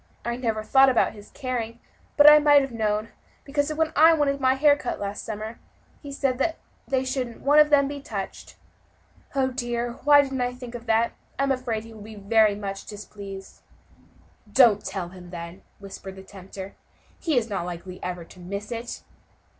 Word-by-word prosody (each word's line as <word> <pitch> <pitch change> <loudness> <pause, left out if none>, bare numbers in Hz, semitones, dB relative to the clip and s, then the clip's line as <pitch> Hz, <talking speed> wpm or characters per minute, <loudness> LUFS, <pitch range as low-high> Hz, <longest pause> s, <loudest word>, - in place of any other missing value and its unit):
I 235 0 -1
never 225 -3 -2
thought 270 +4 +5
about 250 - +2
his 205 -1 -13
caring, 240 -4 -4 0.4
but 290 0 +8
I 300 0 +10
might 290 -1 +5
have 270 - -5
known, 215 -1 -1 0.3
because 285 +1 -1
when 320 +1 0
I 320 +2 +7
wanted 280 -2 0
my 260 0 +3
hair 290 +1 +5
cut 255 - -4
last 200 0 -4
summer, 220 +1 -6 0.4
he 285 - -8
said 275 +3 0 0.3
they 265 -1 0
shouldn't 255 -3 -3
one 290 +2 +5
of 300 0 +6
them 280 -2 +4
be 285 0 -5
touched. 200 -7 -7 0.8
Oh! 265 -1 +2
dear, 240 -1 -3
why 290 0 +7
didn't 270 -2 -3
I 245 0 -1
think 250 -1 -9
of 240 -1 -8
that? 225 +1 +2 0.3
I 275 - +1
am 275 - +1
afraid 245 -4 -2
he 225 0 -12
will 215 - -12
be 215 +1 -10
very 210 +1 +3
much 195 -1 -6
displeased." 200 -2 -9 0.9
"Don't 230 -3 +5
tell 190 -3 -4
him, 180 -1 -12
then," 170 +1 -8 0.2
whispered 195 -1 -9
the 190 - -11
tempter, 195 0 -10 0.5
"he 315 -6 0
is 230 -2 +1
not 195 -5 -3
likely 180 +1 -8
ever 180 -1 -4
to 185 - -16
miss 200 +5 -6
it." 235 +1 -5
235 Hz, 185 wpm, -25 LUFS, 200-270 Hz, 0.9 s, I